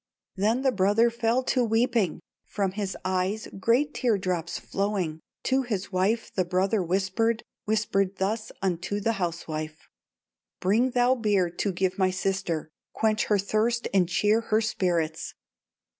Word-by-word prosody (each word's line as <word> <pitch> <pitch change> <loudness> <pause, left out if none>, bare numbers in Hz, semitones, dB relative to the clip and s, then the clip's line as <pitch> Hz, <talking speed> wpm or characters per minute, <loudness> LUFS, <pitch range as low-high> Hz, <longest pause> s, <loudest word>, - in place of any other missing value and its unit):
'" - - -66
"Then 220 +7 +1
the 265 - +4
brother 210 +3 +3
fell 235 +2 +1
to 255 -1 +1
weeping, 225 -5 +1 0.3
From 195 -2 -1
his 195 -1 -3
eyes 185 +4 -1
great 245 +9 +2
tear 240 -5 +1
drops 180 -3 -2
flowing, 195 -6 -2 0.2
To 265 +1 +2
his 210 -7 -3
wife 200 +5 0
the 185 - +1
brother 190 +4 +1
whispered, 190 +6 0 0.2
Whispered 200 -3 +1
thus 215 +3 -2
unto 190 +2 -1
the 225 +3 +1
housewife: 155 -2 -4 0.7
'Bring 220 +7 +2
thou 245 0 +3
beer 205 -7 +1
to 195 +3 -1
give 185 +1 -1
my 190 -1 +4
sister, 185 -3 -2 0.3
Quench 215 -1 +1
her 210 - +3
thirst 220 +4 0
and 180 -3 +3
cheer 210 +5 +3
her 220 -1 +1
spirits. 170 -7 -1
200 Hz, 145 wpm, -27 LUFS, 185-225 Hz, 0.7 s, the